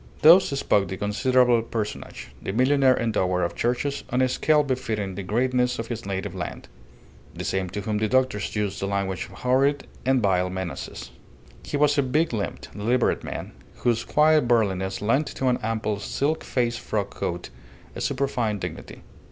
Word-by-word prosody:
Thus 170 +5 +9
spoke 105 -8 +1
the 95 - -5
considerable 120 +4 +3
personage, 110 -2 -5
the - - -3
millionaire 130 +3 +4
endower 95 -6 +1
of - - -3
churches 125 +4 -1
on 125 +1 +2
a - - +4
scale 150 +4 +3
befitting 110 -7 -2
the 100 - -5
greatness 125 +5 +1
of 115 +1 -5
his 115 -4 -5
native 95 -1 -3
land - - -6 0.7
the - - -5
same 95 -1 -1
to 105 - -4
whom 105 +1 -1
the 110 - +1
doctors 130 -5 0
used 105 -2 -1
the 100 - -2
language 100 -2 -2
of - - -14
horrid 135 +3 +1 0.2
and 130 +1 +3
veiled 90 -2 +2
menaces. 85 -9 -6 0.5
He 145 - -3
was 145 0 +3
a - - +6
big 145 +3 +1
limbed, 105 -3 -4
deliberate 120 +4 +1
man, - - -6 0.2
whose 115 -1 0
quiet 155 -3 +4
burliness 95 -5 +1
lent 130 +7 +2
to 130 - +1
an 125 - +1
ample 110 -2 -1
silk 145 +8 -1
faced 120 -2 -1
frock 100 -2 -2
coat 85 0 -4 0.4
a - - -5
superfine 130 -6 0
dignity. 90 -4 -7
115 Hz, 170 wpm, -25 LUFS, 100-130 Hz, 0.7 s, Thus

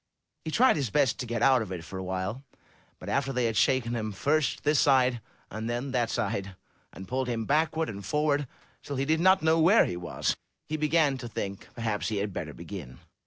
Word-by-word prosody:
He 160 - -4
tried 245 +4 +4
his 135 -6 -1
best 140 0 +2
to 125 - -4
get 120 0 -1
out 130 -2 +5
of 105 -4 -5
it 90 -3 -5
for 95 +4 -7
a - - -4
while, 95 +7 -3 0.5
but - - -11
after 135 -1 0
they 125 -2 0
had 115 -1 0
shaken 120 +1 +2
him 110 -2 -2
first 145 +6 0
this 150 0 +3
side, 130 -3 +3 0.3
and 110 +2 -4
then 120 +3 -2
that 120 -3 +1
side, 100 -3 -2 0.4
and 95 - -10
pulled 130 0 -1
him 115 -2 -2
backward 160 +3 +1
and 100 -1 -6
forward 145 0 0 0.3
till 140 - -6
he 135 +1 0
did 160 +2 +2
not 185 +1 +4
know 160 +1 +4
where 185 +8 +6
he - - -3
was, 90 0 -2 0.3
he 155 - -3
began 150 -3 +2
to 120 - -6
think 100 -3 -5
perhaps 110 -3 -2
he 110 - -2
had 100 0 -2
better 80 -4 -4
begin. 80 -6 -9
125 Hz, 215 wpm, -28 LUFS, 100-145 Hz, 0.5 s, where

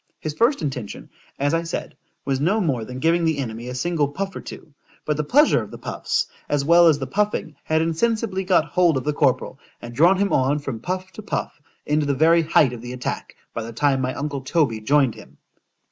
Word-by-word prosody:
His 155 - -4
first 235 - +2
intention, 130 -7 -5 0.3
as 145 +2 0
I 165 - +2
said, 170 0 -5 0.3
was 135 -1 0
no 185 +10 +2
more 140 - 0
than 125 +2 -7
giving 165 +5 +2
the 160 -2 +1
enemy 120 -3 -5
a 125 - -5
single 150 +2 0
puff 190 +6 -5
or - - -6
two;—but 150 0 -7
the 150 - -1
pleasure 290 - +4
of - - -8
the - - -9
puffs, - - -2 0.2
as 145 -1 0
well 170 +2 +6
as 155 -3 +5
the 135 - -4
puffing, 195 0 -1
had 160 0 +2
insensibly 195 +3 0
got 185 -4 +3
hold 170 -1 +2
of 130 - -3
the 150 - -1
corporal, 140 -2 0 0.2
and 120 0 -9
drawn 170 +9 +4
him 200 0 0
on 135 +2 +2
from 135 -6 -5
puff 185 +4 -4
to 215 - -9
puff, 200 -7 -4 0.2
into 150 0 +1
the 140 - +1
very 165 +4 +4
height 150 -5 +3
of 120 - -8
the 120 +1 -7
attack, 125 -1 -5 0.2
by 115 - -3
the 115 +1 -7
time 135 +2 +1
my 130 0 -2
uncle 145 -1 -3
Toby 135 -5 0
joined 135 +2 +2
him. - - -15
150 Hz, 220 wpm, -22 LUFS, 130-170 Hz, 0.3 s, well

